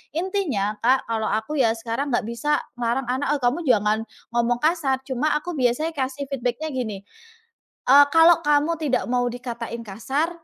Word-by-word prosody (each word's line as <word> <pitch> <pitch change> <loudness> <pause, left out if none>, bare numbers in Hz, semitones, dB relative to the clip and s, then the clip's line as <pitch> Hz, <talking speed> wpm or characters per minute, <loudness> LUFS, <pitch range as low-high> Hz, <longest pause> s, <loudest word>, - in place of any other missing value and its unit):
Intinya, 315 - -1
Kak, 260 -1 +2
kalau 220 -1 -1
aku 220 +8 -2
ya 225 -3 +3
sekarang 235 +4 -3
nggak 240 -1 +1
bisa 295 +6 0 0.2
ngelarang 240 +2 -1
anak, 260 +4 0
"Oh - - -15
kamu 265 +8 0
jangan 215 -2 +2 0.3
ngomong 240 0 +1
kasar." 300 -5 +1
Cuma 270 +3 0
aku 320 +2 -3
biasanya 260 +6 +1
kasih 270 +1 -3
feedback-nya 270 +3 -2
gini, 220 -7 -4 0.9
eee, 285 +2 +8
"Kalau 330 +1 +6
kamu 295 +3 +2
tidak 280 -5 0
mau 245 0 +1
dikatain 235 -1 -5
kasar, 265 - -2
260 Hz, 160 wpm, -23 LUFS, 235-295 Hz, 0.9 s, eee